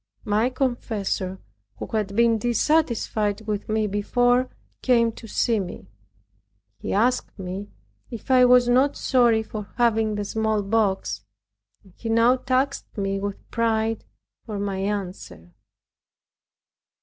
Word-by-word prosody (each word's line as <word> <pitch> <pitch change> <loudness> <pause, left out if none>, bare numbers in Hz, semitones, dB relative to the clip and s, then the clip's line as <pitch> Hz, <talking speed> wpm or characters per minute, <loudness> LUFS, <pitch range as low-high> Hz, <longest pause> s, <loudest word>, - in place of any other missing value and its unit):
My 215 +3 +2
confessor, 220 -7 -2 0.4
who - - -5
had 210 -3 -1
been 230 0 +3
dissatisfied 235 -4 +1
with 210 -1 -4
me 215 0 +1
before, 245 +5 +1 0.3
came 235 -3 +3
to 225 - -12
see 225 +1 +1
me. 175 - -7 0.9
He - - -4
asked 245 +5 +1
me 190 +1 -6 0.4
if 235 +3 -6
I 255 -1 +7
was 250 0 +6
not 260 +4 +3
sorry 240 -4 +3
for 215 -2 -7
having 225 -3 +2
the 205 0 -3
smallpox; 205 - 0 0.6
and 190 - -20
he 230 - -5
now 230 +3 +4
taxed 265 0 -1
me 195 -1 -1
with 200 0 -5
pride 225 -1 0 0.4
for 215 -3 -6
my 200 -1 -2
answer. 190 - -5
220 Hz, 125 wpm, -24 LUFS, 205-245 Hz, 0.9 s, I